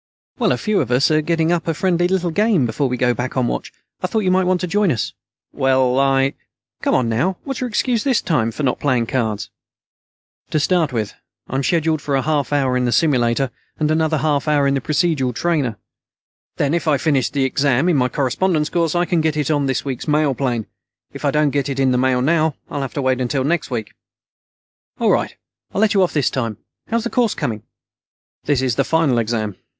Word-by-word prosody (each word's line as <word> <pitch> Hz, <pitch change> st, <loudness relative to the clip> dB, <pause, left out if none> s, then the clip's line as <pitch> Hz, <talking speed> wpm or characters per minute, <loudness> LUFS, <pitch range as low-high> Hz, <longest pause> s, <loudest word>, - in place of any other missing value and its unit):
"Well, -, -, +2 dB
a -, -, +1 dB
few 215 Hz, -2 st, 0 dB
of 130 Hz, -, -3 dB
us 125 Hz, +5 st, +3 dB
are 155 Hz, 0 st, +3 dB
getting 165 Hz, +1 st, +1 dB
up 170 Hz, -1 st, -1 dB
a 165 Hz, -, 0 dB
friendly 175 Hz, 0 st, +1 dB
little 180 Hz, -2 st, 0 dB
game 205 Hz, -, +2 dB
before 125 Hz, +4 st, -1 dB
we 125 Hz, -, -2 dB
go 125 Hz, 0 st, +2 dB
back 125 Hz, +2 st, -4 dB
on 130 Hz, -, +2 dB
watch. -, -, -3 dB, 0.3 s
I 185 Hz, -, 0 dB
thought 220 Hz, +4 st, 0 dB
you 185 Hz, -, +2 dB
might 185 Hz, 0 st, +3 dB
want 185 Hz, 0 st, +2 dB
to -, -, 0 dB
join 200 Hz, 0 st, +2 dB
us." 115 Hz, -, -2 dB, 0.4 s
"Well, 130 Hz, -1 st, +2 dB
I 135 Hz, 0 st, +2 dB, 0.2 s
" -, -, -56 dB
"Come -, -, +1 dB
on, 125 Hz, -, +2 dB
now. 130 Hz, +12 st, 0 dB
What's 270 Hz, -2 st, -5 dB
your 250 Hz, -, -1 dB
excuse 235 Hz, 0 st, 0 dB
this 265 Hz, -6 st, +2 dB
time 125 Hz, -9 st, 0 dB
for 130 Hz, +6 st, -5 dB
not 125 Hz, -, 0 dB
playing 130 Hz, -5 st, +1 dB
cards?" 110 Hz, -4 st, -2 dB, 1.0 s
"To 155 Hz, -, +1 dB
start 165 Hz, -1 st, +1 dB
with, 110 Hz, -4 st, -2 dB, 0.3 s
I'm 135 Hz, +1 st, -1 dB
scheduled 160 Hz, +1 st, +1 dB
for 140 Hz, -, -1 dB
a 135 Hz, -, +1 dB
half 150 Hz, -3 st, 0 dB
hour 135 Hz, -3 st, +1 dB
in 125 Hz, 0 st, +1 dB
the 120 Hz, -, 0 dB
simulator, 125 Hz, -1 st, +2 dB, 0.3 s
and 155 Hz, 0 st, 0 dB
another 160 Hz, 0 st, +1 dB
half 150 Hz, 0 st, 0 dB
hour 145 Hz, -2 st, +3 dB
in 140 Hz, -, +2 dB
the 135 Hz, -, 0 dB
procedural 145 Hz, -4 st, 0 dB
trainer. 145 Hz, -10 st, 0 dB, 0.8 s
Then 145 Hz, +1 st, +1 dB
if 170 Hz, -1 st, -1 dB
I 150 Hz, -2 st, +4 dB
finish 135 Hz, -2 st, +1 dB
the 140 Hz, -2 st, 0 dB
exam 140 Hz, +2 st, +1 dB
in 175 Hz, -, +3 dB
my 125 Hz, -2 st, +2 dB
correspondence 150 Hz, +5 st, 0 dB
course, 170 Hz, -2 st, 0 dB
I 175 Hz, 0 st, +2 dB
can 170 Hz, -1 st, +1 dB
get 155 Hz, -1 st, 0 dB
it 150 Hz, 0 st, 0 dB
on 145 Hz, -2 st, +1 dB
this 130 Hz, 0 st, -1 dB
week's 135 Hz, 0 st, -4 dB
mail 150 Hz, -2 st, +2 dB
plane. 120 Hz, -4 st, -2 dB, 0.5 s
If -, -, -9 dB
I -, -, +4 dB
don't 150 Hz, -1 st, +2 dB
get 140 Hz, 0 st, -1 dB
it 135 Hz, -1 st, -3 dB
in 135 Hz, -1 st, +3 dB
the 125 Hz, -, +2 dB
mail 130 Hz, -1 st, +2 dB
now, 155 Hz, 0 st, +2 dB, 0.2 s
I'll 145 Hz, -, -3 dB
have 135 Hz, -, -5 dB
to 140 Hz, -, -1 dB
wait 130 Hz, -1 st, +1 dB
until 130 Hz, +2 st, 0 dB
next 165 Hz, +3 st, 0 dB
week." 115 Hz, -5 st, -4 dB, 1.1 s
"All -, -, +3 dB
right, -, -, 0 dB, 0.4 s
I'll 200 Hz, -, +1 dB
let 220 Hz, -1 st, +3 dB
you 195 Hz, -, +3 dB
off 180 Hz, -, +2 dB
this 145 Hz, -4 st, +1 dB
time. 115 Hz, -5 st, -2 dB, 0.3 s
How's 230 Hz, 0 st, -1 dB
the 235 Hz, -, -3 dB
course 240 Hz, -4 st, +1 dB
coming?" 110 Hz, -3 st, -3 dB, 0.8 s
"This 140 Hz, -3 st, +1 dB
is 125 Hz, -4 st, 0 dB
the -, -, +3 dB
final 155 Hz, -7 st, +2 dB
exam. 110 Hz, -3 st, -2 dB
145 Hz, 230 wpm, -19 LUFS, 130-165 Hz, 1.1 s, I